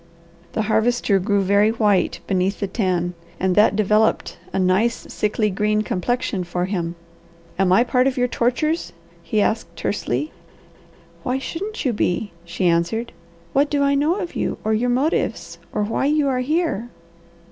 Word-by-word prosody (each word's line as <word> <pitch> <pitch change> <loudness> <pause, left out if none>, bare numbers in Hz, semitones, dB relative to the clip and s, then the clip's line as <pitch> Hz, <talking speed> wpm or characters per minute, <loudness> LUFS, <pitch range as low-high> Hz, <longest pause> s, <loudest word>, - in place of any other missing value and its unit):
The 220 - 0
Harvester 220 -1 +2
grew 200 +1 +1
very 200 +2 +4
white 210 -4 +1
beneath 190 +1 0
the 200 - 0
tan, 185 -4 -1 0.3
and 185 0 +1
that 210 0 +5
developed 215 +1 +1
a - - -2
nice, 190 +5 +2 0.2
sickly 210 0 0
green 210 +2 +1
complexion 210 0 -1
for 175 +1 -2
him. 175 -3 -3 0.6
"Am 190 -2 +3
I 195 +6 +6
part 250 +1 +2
of 265 0 -1
your 250 0 +2
tortures?" 280 +8 0 0.3
he 215 -3 0
asked 220 +2 -1
tersely. 145 -7 -2 0.9
"Why 250 +8 -1
shouldn't 380 +10 -5
you 250 - +2
be?" 205 0 -1
she 170 +2 -3
answered. 175 +7 +1 0.4
"What 285 +2 +3
do 285 -1 +1
I 280 0 +3
know 295 +5 +2
of 360 -4 -5
you - - -1
or 220 - +1
your 240 +3 +1
motives 270 +7 -1
or 210 - -1
why 220 +5 -1
you 300 -1 +2
are 255 -1 0
here?" 290 - -1
215 Hz, 160 wpm, -21 LUFS, 190-250 Hz, 0.9 s, I